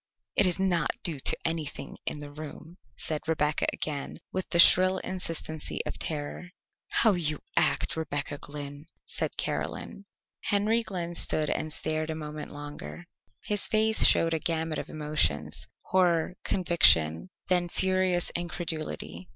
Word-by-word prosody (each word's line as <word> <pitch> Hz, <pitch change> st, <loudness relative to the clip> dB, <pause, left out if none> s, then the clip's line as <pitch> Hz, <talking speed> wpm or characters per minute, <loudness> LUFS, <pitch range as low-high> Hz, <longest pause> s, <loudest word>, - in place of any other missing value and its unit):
"It 195 Hz, -, +4 dB
is 180 Hz, +1 st, +1 dB
not 180 Hz, -4 st, +1 dB
due 160 Hz, -6 st, 0 dB
to -, -, +5 dB
anything 160 Hz, -3 st, -4 dB
in -, -, 0 dB
the 145 Hz, -1 st, -9 dB
room," 155 Hz, +3 st, -10 dB, 0.2 s
said 155 Hz, -2 st, -2 dB
Rebecca 155 Hz, -1 st, +1 dB
again 145 Hz, -3 st, -4 dB, 0.2 s
with 185 Hz, -, -3 dB
the 170 Hz, -, +1 dB
shrill 185 Hz, +2 st, +7 dB
insistency 165 Hz, -4 st, -4 dB
of -, -, -5 dB
terror. 155 Hz, +3 st, -4 dB, 0.4 s
"How 225 Hz, -, +4 dB
you 155 Hz, -4 st, -1 dB, 0.2 s
act, -, -, +2 dB
Rebecca 145 Hz, -2 st, -3 dB
Glynn," 145 Hz, +1 st, -5 dB, 0.2 s
said -, -, -3 dB
Caroline. 200 Hz, -, -4 dB, 0.4 s
Henry 210 Hz, +3 st, +2 dB
Glynn 180 Hz, -6 st, -5 dB
stood 155 Hz, -2 st, +3 dB
and 155 Hz, -, -2 dB
stared 155 Hz, 0 st, -2 dB
a 160 Hz, -, -2 dB
moment 150 Hz, -1 st, -7 dB
longer. 145 Hz, -, -9 dB, 0.4 s
His 205 Hz, -2 st, +2 dB
face 220 Hz, 0 st, +5 dB
showed 165 Hz, 0 st, +3 dB
a 160 Hz, -, 0 dB
gamut 160 Hz, 0 st, -1 dB
of -, -, -6 dB
emotions 80 Hz, -, -1 dB, 0.2 s
horror, 180 Hz, -2 st, +2 dB
conviction, 165 Hz, -, +4 dB, 0.2 s
then 180 Hz, -1 st, +1 dB
furious 185 Hz, -1 st, +1 dB
incredulity. 160 Hz, -, -4 dB
160 Hz, 140 wpm, -28 LUFS, 150-180 Hz, 0.4 s, shrill